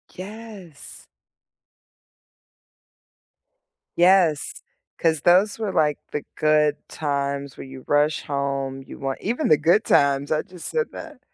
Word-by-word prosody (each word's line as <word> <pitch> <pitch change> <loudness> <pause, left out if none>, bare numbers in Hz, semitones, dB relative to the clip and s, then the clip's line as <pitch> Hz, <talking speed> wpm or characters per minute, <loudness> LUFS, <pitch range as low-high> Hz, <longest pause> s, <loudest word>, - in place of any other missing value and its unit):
Yes. 200 -4 -11 2.9
Yes, 175 -4 +3 0.4
'cause 160 -3 +1
those 195 +5 +3
were 215 -3 -2
like 150 -2 +2
the 150 - -3
good 150 -1 +3
times 140 -2 -3
where - - -8
you 130 -1 -11
rush 145 +1 +2
home, 135 -1 -3
you - - -11
want 135 -1 -3
Even 240 +8 -1
the 155 - +5
Good 170 +8 +3
Times, 140 0 +2
I 155 - +2
just 180 -2 -9
said 470 -1 -1
that. - - -10
155 Hz, 120 wpm, -23 LUFS, 140-185 Hz, 2.9 s, the